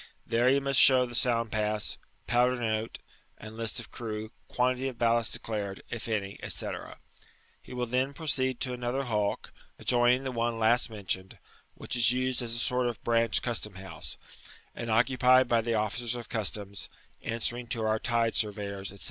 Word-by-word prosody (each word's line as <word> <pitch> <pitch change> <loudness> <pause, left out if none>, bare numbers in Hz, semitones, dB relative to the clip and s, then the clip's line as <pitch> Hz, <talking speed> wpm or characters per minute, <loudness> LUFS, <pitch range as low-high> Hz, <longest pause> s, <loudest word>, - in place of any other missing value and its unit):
There 120 +2 +3
he 135 +1 +4
must 135 -1 +2
show 130 -2 +8
the»ound 120 -2 +1
pass, 105 -1 -1 0.3
powder 125 +1 +3
note, 110 -2 -2 0.4
and 110 0 -10
list 115 +2 -1
of 115 - -8
crew,^ 110 -1 -5 0.2
(]^uantity 130 +1 +1
of 125 - -10
ballast 115 -1 +2
declared, 100 -3 -3
if 115 - -4
anv, 100 -3 -3
&c. - - -3 0.9
He - - -15
will 125 0 -1
then 130 +3 0
Eroceed 130 -4 0
to 125 - -1
another 125 +2 -2
hulk, 105 -5 -2 0.3
adjoimng 125 +1 +3
the 130 - -3
one 115 -1 -1
last 115 +2 +3
mentioned, 95 -3 -4 0.4
which - - -3
is 120 -1 +5
used 130 0 0
as 115 -1 -2
a - - -2
sort 125 +1 +1
of 120 - -3
ranch 115 -1 +2
custom 110 -5 -2
house, 95 0 -6 0.6
and 115 - -5
occupied 125 +2 +4
by 120 -1 +3
the 115 0 -1
officers 110 +3 -1
of 120 -2 -7
customs, 100 -2 -3 0.3
answering 120 +1 -2
to 115 -2 -1
our 110 0 +1
tide 115 -2 +1
surveyors, 100 -2 -2
&c. 100 - -10
115 Hz, 170 wpm, -29 LUFS, 110-125 Hz, 0.9 s, show